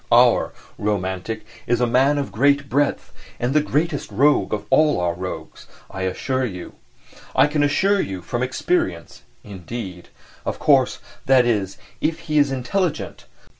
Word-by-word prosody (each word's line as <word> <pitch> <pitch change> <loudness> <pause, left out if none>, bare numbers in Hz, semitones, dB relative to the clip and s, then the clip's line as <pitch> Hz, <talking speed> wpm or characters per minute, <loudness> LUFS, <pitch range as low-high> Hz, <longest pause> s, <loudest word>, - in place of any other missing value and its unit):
Our - - +5 0.3
"romantic" 100 +1 -2 0.2
is 120 0 +2
a 125 - +3
man 130 +5 +3
of 140 - -2
great 140 +4 +2
breadth 145 +1 0 0.3
and 120 +2 0
the 150 - +4
greatest 150 +1 -1
rogue 145 +2 +3
of 105 -1 -2
all 155 -9 +4
our 90 -1 0
rogues, 90 +1 -7 0.2
I 95 0 -2
assure 130 +7 -2
you.... 90 -8 -5 0.6
I - - +6
can 150 0 0
assure 195 +8 +2
you 95 -2 -5
from 120 +7 -3
experience, 125 - -1 0.2
indeed. 95 -1 -8 0.3
Of - - -3
course, - - +3 0.3
that 130 -2 +5
is, 105 -5 0 0.2
if 165 +1 -1
he 150 -2 +1
is 145 -1 +3
intelligent. 155 +5 -2
125 Hz, 150 wpm, -22 LUFS, 95-145 Hz, 0.6 s, I